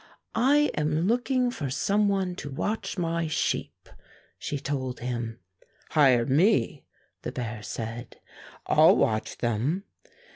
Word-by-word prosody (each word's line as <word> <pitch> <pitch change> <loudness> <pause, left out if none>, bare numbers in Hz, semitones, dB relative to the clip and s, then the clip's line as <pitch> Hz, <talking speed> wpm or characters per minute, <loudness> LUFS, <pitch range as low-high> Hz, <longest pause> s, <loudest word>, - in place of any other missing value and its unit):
"I 285 +6 +3
am 150 +1 0
looking 245 +3 +1
for 145 - -4
some 200 +9 +1
one 190 -2 0
to 145 - -6
watch 205 +11 -3
my 165 -1 -1
sheep," 155 - -2 0.5
she 145 - -3
told 135 -2 -3
him. 120 -2 -4 0.5
"Hire 130 -6 +5
me," 140 - +2 0.4
the - - -4
bear 115 -3 -5
said. 115 +3 -6 0.5
"I'll - - +6
watch 110 0 0
them." 120 - -1
145 Hz, 120 wpm, -27 LUFS, 120-195 Hz, 0.5 s, I'll